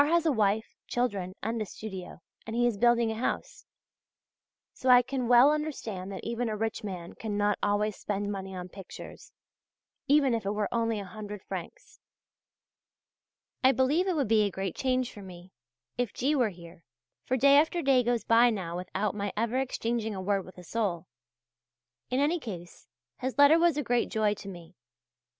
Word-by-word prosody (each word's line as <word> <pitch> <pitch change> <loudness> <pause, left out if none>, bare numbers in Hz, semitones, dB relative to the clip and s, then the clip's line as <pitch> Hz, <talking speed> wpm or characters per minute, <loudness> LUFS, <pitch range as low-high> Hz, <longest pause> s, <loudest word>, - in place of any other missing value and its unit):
has 335 +1 +2
a 315 - +4
wife, 220 -2 +1
children, 200 -7 -2
and 225 +2 -2
a - - -1
studio, 190 -4 -8 0.3
and 225 - -4
he 240 +1 +3
is 240 -3 +2
building 235 -1 +4
a 220 +1 -5
house; - - -3 1.1
so 260 - -2
I 250 0 +8
can 260 -1 -3
well 245 +4 +7
understand 230 -11 -3
that 190 - -7
even 235 0 -2
a 215 - -3
rich 220 0 -2
man 180 -4 -6
cannot 205 -1 -1
always 205 0 +1
spend 205 0 -3
money 190 -1 -5
on 180 0 -6
pictures, 190 0 -11 0.8
even 280 -3 +4
if 230 - -1
it 200 +1 -1
were 210 -1 0
only 230 -2 0
a 200 - -6
hundred 210 +1 -8
francs. - - -8 1.6
I 260 +1 +6
believe 285 +9 +2
it 370 - +1
would 280 -6 +1
be 220 0 +4
a 205 - +2
great 190 -1 -4
change 255 -1 0
for 205 - -10
me, 180 -1 -12 0.5
if 245 -4 -1
G. 275 +4 +1
were 245 -6 +2
here, 170 -2 -13 0.4
for 260 - +1
day 280 +2 +6
after 320 +3 +2
day 270 -2 +4
goes 240 -1 0
by 235 +1 +5
now 185 -7 -3
without 190 +3 -2
my 200 -1 -3
ever 230 +3 0
exchanging 230 -4 -2
a - - -4
word 195 0 0
with 185 - -14
a 180 - -10
soul. 180 -4 -2 1.0
In 255 - 0
any 310 +5 +2
case 175 - -9 0.3
his 260 +1 -3
letter 290 +3 +7
was 340 -3 +3
a 295 - 0
great 240 -1 +1
joy 215 -2 +1
to 200 - -10
me. 175 -2 -11
220 Hz, 185 wpm, -29 LUFS, 195-255 Hz, 1.6 s, I